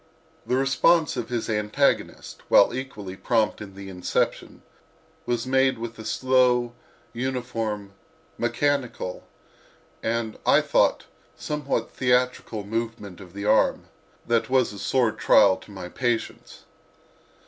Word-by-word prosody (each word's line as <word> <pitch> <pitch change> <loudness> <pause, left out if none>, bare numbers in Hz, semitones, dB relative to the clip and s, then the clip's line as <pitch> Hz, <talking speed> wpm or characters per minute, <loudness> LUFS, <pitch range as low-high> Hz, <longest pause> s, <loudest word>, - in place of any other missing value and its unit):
The 125 - +1
response 140 +5 +3
of 120 -3 -4
his 120 -2 -2
antagonist, 105 +6 -1
while - - +6
equally 115 -8 -6
prompt 110 +1 0
in 95 -2 -9
the 100 0 -9
inception, 90 -2 -2 0.6
was 120 -1 -1
made 130 0 +2
with 115 0 -7
a 110 - -8
slow, 125 0 +2 0.4
uniform, 115 -5 -3 0.4
mechanical 120 -4 -2 0.7
and, 115 -1 -2
I - - +5
thought, - - +2 0.3
somewhat 150 -2 -3
theatrical 125 -4 0
movement 110 -3 -5
of 90 -2 -13
the 100 +1 -6
arm, 110 +1 +2 0.4
that 115 -1 +1
was 130 -4 +2
a 100 - -9
sore 125 -1 +2
trial 100 -2 +5
to - - -16
my 95 -3 -8
patience. 120 +4 -3
115 Hz, 120 wpm, -25 LUFS, 105-130 Hz, 0.7 s, while